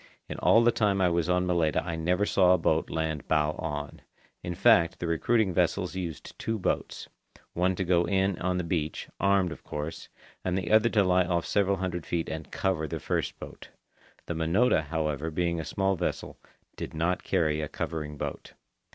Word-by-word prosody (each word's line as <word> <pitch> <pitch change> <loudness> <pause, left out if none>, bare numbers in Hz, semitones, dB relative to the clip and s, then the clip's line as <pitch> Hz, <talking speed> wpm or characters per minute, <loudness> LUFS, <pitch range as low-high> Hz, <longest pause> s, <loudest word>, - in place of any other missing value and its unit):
In - - -6
all 115 - +5
the 120 - +5
time 105 -4 +1
I 90 -1 +3
was 85 0 0
on 90 0 +2
Malaita 85 -5 +1
I 85 -2 -3
never 90 +5 +1
saw 90 -3 +4
a - - 0
boat 80 -1 +1
land 80 -3 -3
bow 75 -1 +2
on. 75 -2 -5 0.4
In 90 0 -4
fact, 85 -5 +4
the - - -4
recruiting 95 +5 +1
vessels 90 +1 0
use 85 -6 -4
two 115 0 -5
boats—one 90 -1 -3
to 95 - -1
go 90 -1 +2
in 95 +1 +1
on 90 0 0
the 90 - -1
beach, 80 -2 -3
armed, 100 -3 +2
of 85 - -9
course, 75 +2 -6 0.3
and 90 0 0
the 90 -3 -3
other 110 +1 +5
to 105 -4 +3
lie 90 -1 +3
off 85 -1 0
several 100 -1 +1
hundred 90 -3 -4
feet 85 -1 -2
and 80 -1 -6
"cover" 90 -5 -1
the - - -4
first - - -2
boat. - - -10 0.6
The - - -3
Minota, 80 +2 +2
however, 75 0 -2
being 85 +1 -1
a - - -3
small 95 +2 0
vessel, - - -4 0.4
did - - -6
not 85 +3 0
carry 80 -5 +1
a 75 - -3
covering 75 -2 -4
boat. - - -6
85 Hz, 190 wpm, -28 LUFS, 80-95 Hz, 0.6 s, all